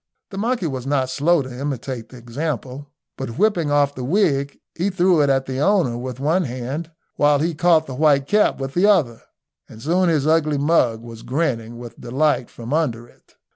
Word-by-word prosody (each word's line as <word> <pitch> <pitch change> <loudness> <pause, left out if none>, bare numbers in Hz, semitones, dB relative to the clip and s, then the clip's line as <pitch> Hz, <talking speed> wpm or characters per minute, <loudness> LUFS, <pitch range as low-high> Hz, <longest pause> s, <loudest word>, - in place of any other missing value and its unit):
The 195 - -7
monkey 230 -2 -1
was 130 -4 -4
not 135 -2 0
slow 145 +4 +2
to 130 -1 -9
imitate 130 -4 -4
the 130 - -12
example, 135 +2 -5 0.3
but 130 -4 -5
whipping 180 -6 +2
off 145 -1 +2
the 130 - -6
wig, 140 -3 +1 0.2
he 180 +4 -1
threw 180 -3 +3
it 145 - +2
at 135 -1 +1
the 130 0 -4
owner 175 - +2
with 125 +1 -6
one 160 +6 +1
hand 130 +6 -5 0.3
while 145 0 +4
he 165 +4 -1
caught 160 0 +3
the 135 - -7
white 140 0 +3
cap 210 0 +2
with 135 0 -4
the 185 +4 +3
other, 155 - +2 0.5
and 110 - -12
soon 175 +8 +1
his 150 -4 +1
ugly 155 -2 +2
mug 135 -7 +1
was 115 -1 -10
grinning 120 -5 -2
with 120 -1 -11
delight 130 +1 0
from 120 +3 -7
under 120 -8 -1
it. - - -27
145 Hz, 195 wpm, -21 LUFS, 125-165 Hz, 0.5 s, while